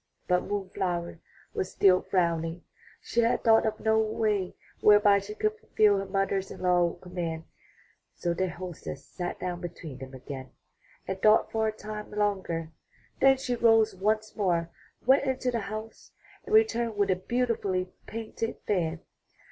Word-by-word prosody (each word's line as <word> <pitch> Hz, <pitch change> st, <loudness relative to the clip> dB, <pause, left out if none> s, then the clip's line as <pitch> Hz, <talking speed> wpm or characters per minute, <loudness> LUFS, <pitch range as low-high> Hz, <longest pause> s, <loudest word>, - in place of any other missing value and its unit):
But 180 Hz, 0 st, +2 dB
Moon 205 Hz, -2 st, -2 dB
flower 175 Hz, -2 st, -2 dB, 0.3 s
was -, -, -2 dB
still 185 Hz, -2 st, +5 dB
frowning; 170 Hz, -2 st, 0 dB, 0.4 s
she 235 Hz, -, -1 dB
had 230 Hz, +1 st, +1 dB
thought 225 Hz, -1 st, +5 dB
of 215 Hz, 0 st, -2 dB
no 220 Hz, 0 st, +3 dB
way 215 Hz, -3 st, 0 dB, 0.2 s
whereby 205 Hz, -1 st, +6 dB
she 205 Hz, +2 st, -8 dB
could 430 Hz, -, 0 dB
fulfill 215 Hz, -, +3 dB
her 195 Hz, -, -4 dB
mother 195 Hz, 0 st, 0 dB
in -, -, -9 dB
law's 175 Hz, -1 st, +2 dB
command. 170 Hz, -3 st, -4 dB, 0.7 s
So 175 Hz, -, -1 dB
their 185 Hz, +2 st, -1 dB
hostess 175 Hz, -6 st, -7 dB
sat 175 Hz, -1 st, -5 dB
down 180 Hz, -1 st, -4 dB
between 160 Hz, -6 st, -7 dB
them 130 Hz, 0 st, -9 dB
again 130 Hz, 0 st, -8 dB, 0.5 s
and 190 Hz, 0 st, -4 dB
thought 215 Hz, +1 st, +5 dB
for 220 Hz, 0 st, +1 dB
a -, -, +1 dB
time 215 Hz, 0 st, -7 dB
longer. 190 Hz, -6 st, -1 dB, 0.5 s
Then 270 Hz, 0 st, +6 dB
she 250 Hz, -2 st, -2 dB
rose 225 Hz, -2 st, +4 dB
once 215 Hz, +3 st, 0 dB
more, 170 Hz, -5 st, 0 dB, 0.3 s
went 270 Hz, +3 st, +5 dB
into 260 Hz, -1 st, 0 dB
the 235 Hz, -, -1 dB
house, 215 Hz, +1 st, -8 dB, 0.3 s
and 430 Hz, -, +2 dB
returned 235 Hz, -, +3 dB
with 200 Hz, -1 st, +2 dB
a -, -, +3 dB
beautifully 195 Hz, -3 st, -1 dB, 0.2 s
painted 225 Hz, 0 st, -4 dB
fan. 170 Hz, -5 st, 0 dB
200 Hz, 155 wpm, -28 LUFS, 175-220 Hz, 0.7 s, whereby